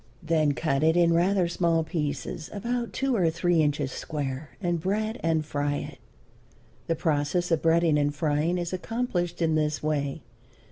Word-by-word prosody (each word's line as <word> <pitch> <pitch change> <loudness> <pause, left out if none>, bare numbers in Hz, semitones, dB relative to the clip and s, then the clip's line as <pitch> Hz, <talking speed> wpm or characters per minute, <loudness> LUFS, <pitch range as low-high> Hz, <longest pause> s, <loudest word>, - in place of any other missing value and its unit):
Then 155 -2 +2
cut 135 +3 0
it 160 +2 +3
in 170 -1 +4
rather 180 +2 +3
small 170 -1 +1
pieces, 150 -2 -3
about 235 +3 -2
two 270 -1 0
or 180 -6 +3
three 170 0 +2
inches 145 -2 0
square, 145 0 -4
and 175 -4 -1
bread 215 +5 -1
and 160 -2 +1
fry 145 -1 -1
it. - - -6 0.9
The 165 - +1
process 160 +3 0
of 165 - +2
breading 165 -2 +3
and 145 0 +1
frying 150 +3 0
is 175 0 -3
accomplished 180 -4 -2
in 160 -1 +2
this 150 -1 0
way. 145 -2 -1
165 Hz, 160 wpm, -27 LUFS, 150-175 Hz, 0.9 s, in